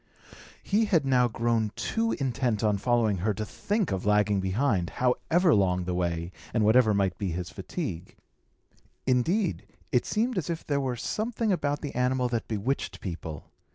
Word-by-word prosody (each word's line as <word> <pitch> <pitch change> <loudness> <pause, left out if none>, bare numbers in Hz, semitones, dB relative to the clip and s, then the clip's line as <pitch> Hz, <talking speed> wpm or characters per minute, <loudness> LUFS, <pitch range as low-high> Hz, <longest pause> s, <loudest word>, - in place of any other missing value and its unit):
He 215 +3 +2
had 165 -9 +2
now 125 -2 +4
grown 115 -2 0
too 225 0 -1
intent 125 - -1
on 105 -2 +2
following 115 -3 +2
her 100 +3 0
to 110 - -3
think 205 - -1
of 95 -1 -2
lagging 105 -1 +3
behind, 95 -1 0
however 160 +7 +3
long 90 -3 +2
the 90 0 -3
way, 85 -1 -1 0.2
and 110 -2 +3
whatever 110 +1 +5
might 100 -3 0
be 100 -3 -1
his 90 0 -4
fatigue. 85 +3 -5 0.9
Indeed, 165 - +1 0.2
it 125 -4 +2
seemed 230 0 0
as 160 - -5
if 165 -1 -3
there 145 -1 0
were 130 -2 -1
something 215 - -1
about 145 -5 0
the 145 - -5
animal 125 0 +1
that 115 -2 -2
bewitched 105 -3 -2
people. 80 -4 -7
120 Hz, 165 wpm, -28 LUFS, 100-145 Hz, 0.9 s, whatever